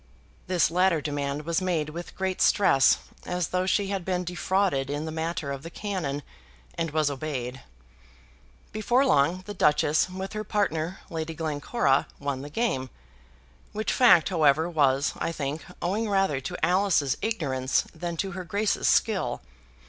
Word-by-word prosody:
This 180 -3 +2
latter 180 -1 +3
demand 145 0 -3
was 170 +2 0
made 170 -5 0
with 170 +2 -8
great 190 -1 -2
stress, 160 -10 +5 0.3
as 180 -2 -2
though 185 0 0
she 195 +1 +1
had 195 -2 -2
been 180 0 -1
defrauded 180 -5 0
in 145 +2 -3
the 160 - -4
matter 160 -2 -3
of 135 -1 -5
the 165 - -8
cannon, 170 -7 -3 0.5
and 165 -1 -2
was 155 -1 +1
obeyed. 135 -3 -4 1.1
Before 240 +5 +2
long, 175 - +2
the 205 - -6
Duchess, 150 -2 +3
with 190 +2 -6
her 215 0 -3
partner, 185 -4 -1
Lady 160 0 -4
Glencora, 155 - 0
won 140 -2 -3
the 145 - -7
game, 145 - -1 0.8
which 215 +1 -1
fact, 240 - +6
however, 160 -2 +3
was, 140 -4 +2
I - - -1
think, 145 -1 -4 0.2
owing 210 +5 0
rather 195 -9 +1
to 135 - -2
Alice's 180 -6 +2
ignorance 140 - 0
than 170 +1 -5
to 195 +3 -2
her 185 0 -5
Grace's 205 +5 0
skill. 215 -5 +2
165 Hz, 155 wpm, -26 LUFS, 145-190 Hz, 1.1 s, fact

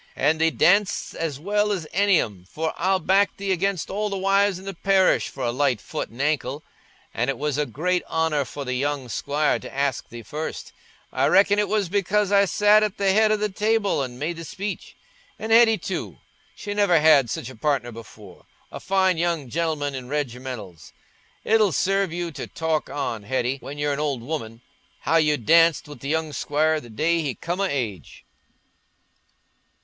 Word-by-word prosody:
An' 155 +1 +1
thee 160 0 +4
danc'st 195 +5 +2
as 155 -4 -4
well 205 +5 0
as 185 -6 -2
any 200 0 +4
of 110 - -1
'em, 90 -2 -18
for 160 +1 -2
I'll 190 +2 +1
back 190 +3 +2
thee 195 -1 -2
against 190 -1 -1
all 210 +2 -1
the 200 - -3
wives 195 0 +2
i' - - -13
the 195 0 -5
parish 190 +1 +2
for 135 - -7
a 120 - 0
light 130 -2 +1
foot - - -5
an' 120 - -15
ankle. 145 -1 -1 0.5
An' 120 +3 -1
it 135 - -1
was 150 0 -2
a 150 - 0
great 175 +9 -1
honour 160 -3 0
for 140 +2 -7
the 130 - -2
young 135 0 -2
squire 145 +6 0
to - - -10
ask 140 -2 -2
thee 120 0 -9
first—I 155 +7 -5
reckon 205 +1 +4
it 210 - +1
was 210 -2 +1
because 200 +2 0
I 200 0 +5
sat 210 +2 +4
at 210 -2 -1
th' 195 -1 +2
head 215 +1 +4
o' 215 - +3
the 210 0 0
table 210 -3 +1
an' 125 -2 -7
made 160 +5 -3
the 165 - -7
speech. 195 +5 -6 0.4
An' 220 +1 -5
Hetty 225 -1 +6
too—she 205 - -7
never 200 -5 +3
had 150 -5 +5
such 120 - -4
a - - -13
partner 130 -1 -1
before—a 110 -4 -13
fine 190 -2 +1
young 165 -6 -1
gentleman 155 -2 -1
in 130 -2 -7
reg'mentals. 125 - -5 0.5
It'll 215 -3 +3
serve 195 +3 +1
you 170 0 -3
to - - -7
talk 160 -2 -2
on, 135 -6 -3
Hetty, 125 +4 -1
when 145 +2 -8
you're 145 0 0
an 140 - -3
old 140 -6 -2
woman—how 125 +3 -4
you 150 -2 +3
danced 165 +7 +4
wi' 150 - -9
th' 140 - -13
young 155 +1 -1
squire 155 +4 0
the 120 - -13
day 165 +9 +1
he 140 -5 -3
come 175 +3 -3
o' - - +2
age." 110 - -4
160 Hz, 190 wpm, -23 LUFS, 135-195 Hz, 0.5 s, Hetty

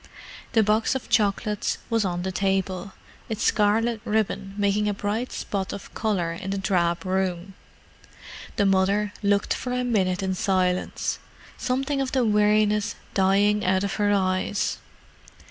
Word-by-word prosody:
The 225 -2 +5
box 215 +5 +2
of 265 - -5
chocolates 210 -1 +1
was 225 -1 +2
on 175 -1 -2
the 190 - -2
table, 190 0 -1 0.4
its 220 - -2
scarlet 220 +2 +2
ribbon 210 -3 -1
making 205 +1 +1
a 205 - -1
bright 210 +5 -2
spot 195 -2 -3
of 200 - -9
colour 190 -7 -1
in 185 +3 -6
the 195 - -1
drab 175 -3 0
room. 185 0 -1 1.0
The 205 - +2
mother 200 +2 +2
looked 200 -1 +2
for 250 - -4
a 250 0 0
minute 195 -6 +1
in 190 0 0
silence, 185 -1 0 0.4
something 270 +2 -1
of 265 - -3
the 260 -3 +2
weariness 210 0 +2 0.2
dying 200 +2 +3
out 185 +1 +2
of 200 -1 -2
her 205 0 +3
eyes. 190 +1 0
200 Hz, 145 wpm, -25 LUFS, 190-215 Hz, 1.0 s, The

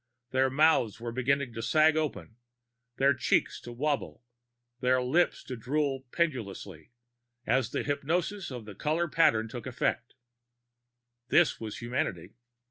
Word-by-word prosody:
Their 130 0 +3
mouths 135 -7 +3
were 120 0 -5
beginning 130 +1 0
to 115 - -5
sag 155 +4 +4
open, 115 - -3 0.6
their 140 +1 +4
cheeks 130 - 0
to 120 - -9
wobble, 140 +1 -2 0.6
their 130 0 +3
lips 140 +8 +1
to 130 - -6
droop 135 +1 -2
pendulously, 100 - -3 0.6
as 130 -4 +1
the - - -2
hypnosis 170 +7 -1
of 125 -4 -7
the 105 - -9
color 155 - 0
patterns 115 -9 +2
took 120 0 -6
effect. 120 -1 -2 1.1
This - - +3
was 110 -2 -6
humanity. 110 -7 -3
130 Hz, 130 wpm, -29 LUFS, 115-150 Hz, 1.1 s, sag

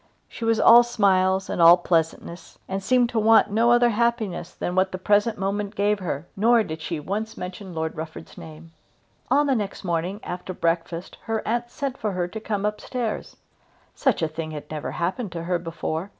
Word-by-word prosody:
She - - -9
was 225 -1 +2
all 235 +1 +8
smiles 190 -5 +2
and - - -2
all 170 +1 +9
pleasantness, 170 0 -2
and 195 +1 -3
seemed 245 +4 +2
to 235 - 0
want 220 -1 +5
no 230 +3 +3
other 240 0 +5
happiness 220 -6 -1
than 175 - -4
what 190 +1 +2
the 185 - -4
present 205 +3 +2
moment 200 +2 -2
gave 205 +1 +1
her. 160 -5 -4
Nor 230 +3 +4
did 160 -4 -7
she 160 0 -4
once 205 +8 -4
mention 180 0 -7
Lord 160 0 -3
Rufford's 160 0 -8
name. 160 +1 -12 0.6
On 290 +1 +4
the 275 - +2
next 205 -5 -3
morning 175 +3 -2
after 180 +1 -6
breakfast 165 +1 -2
her 225 -1 -2
aunt 240 +2 -1
sent 275 0 -4
for 210 -3 -2
her 180 -1 -1
to 220 - -6
come 210 -2 -2
up 210 0 -2
stairs. 240 -4 -4 0.6
Such 265 - 0
a - - +2
thing 155 +1 -6
had 150 -1 -8
never 155 -1 -4
happened 185 +4 -2
to 165 -1 -5
her 175 0 -1
before. 165 +1 -4
195 Hz, 195 wpm, -24 LUFS, 170-220 Hz, 0.6 s, all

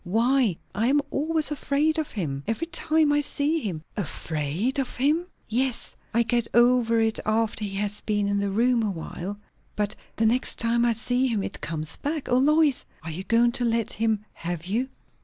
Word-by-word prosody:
Why, 230 0 +2 0.2
I 215 +4 +1
am 285 +3 +4
always 310 +1 +1
afraid 300 +2 +1
of 310 - -2
him, 145 -10 -3
every 225 +9 -1
time 315 -2 +2
I 295 - +3
see 295 +3 +1
him." 180 - -3
"Afraid 170 - -2
of 265 - -2
him?" 305 +7 +2 0.2
"Yes. 245 +2 -1 0.2
I 235 +1 +3
get 235 0 +1
over 240 -1 +4
it 225 -1 +1
after 220 0 0
he 200 -1 -3
has 205 +1 -2
been 205 -1 0
in 200 0 +1
the 200 0 0
room 235 +4 +2
a 215 - 0
while; 185 +2 -5 0.4
but 210 0 -1 0.2
the 225 - +1
next 240 +3 +2
time 235 0 +2
I 235 - +3
see 245 +3 0
him 220 -5 0
it - - -5
comes 155 0 -4
back. 300 0 -3
O 245 - +4
Lois! 300 0 +3 0.2
are 165 - -5
you 175 +4 -5
going 235 +2 +4
to 245 - -2
let 230 -2 0
him 220 -1 0
have 170 -1 -5
you?" 235 +8 -1
230 Hz, 195 wpm, -25 LUFS, 205-265 Hz, 0.4 s, am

